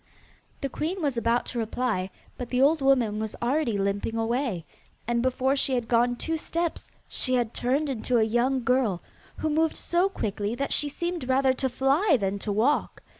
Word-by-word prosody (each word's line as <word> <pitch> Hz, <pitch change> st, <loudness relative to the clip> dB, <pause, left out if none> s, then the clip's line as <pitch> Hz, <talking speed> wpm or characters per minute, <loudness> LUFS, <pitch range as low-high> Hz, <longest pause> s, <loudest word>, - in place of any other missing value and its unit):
The 275 Hz, -, 0 dB
queen 335 Hz, +8 st, -3 dB
was 280 Hz, -4 st, 0 dB
about 235 Hz, +1 st, +1 dB
to 245 Hz, -, -4 dB
reply, 220 Hz, -4 st, -1 dB, 0.3 s
but 245 Hz, -1 st, -6 dB
the 250 Hz, -, 0 dB
old 290 Hz, +3 st, +4 dB
woman 250 Hz, -6 st, +3 dB
was 220 Hz, -1 st, -4 dB
already 245 Hz, -2 st, 0 dB
limping 200 Hz, +3 st, -1 dB
away, 225 Hz, -, -1 dB, 0.4 s
and 235 Hz, 0 st, +1 dB
before 260 Hz, +2 st, +1 dB
she 270 Hz, -1 st, +1 dB
had 240 Hz, -2 st, -2 dB
gone 240 Hz, +1 st, +3 dB
two 325 Hz, +6 st, -2 dB
steps 335 Hz, +1 st, -3 dB, 0.2 s
she 255 Hz, -, +1 dB
had 240 Hz, -2 st, 0 dB
turned 275 Hz, +5 st, 0 dB
into 250 Hz, -2 st, 0 dB
a 225 Hz, -, +4 dB
young 240 Hz, +4 st, +1 dB
girl, 235 Hz, -8 st, +1 dB, 0.3 s
who 315 Hz, -, -2 dB
moved 320 Hz, +1 st, +1 dB
so 350 Hz, +3 st, +1 dB
quickly 210 Hz, -, -3 dB
that 275 Hz, +2 st, -1 dB
she 295 Hz, -, +2 dB
seemed 345 Hz, -3 st, -4 dB
rather 260 Hz, 0 st, +3 dB
to 265 Hz, +1 st, -1 dB
fly 275 Hz, -, +3 dB
than 200 Hz, 0 st, -1 dB
to 205 Hz, -, -3 dB
walk. 235 Hz, +9 st, +1 dB
250 Hz, 185 wpm, -26 LUFS, 230-280 Hz, 0.4 s, old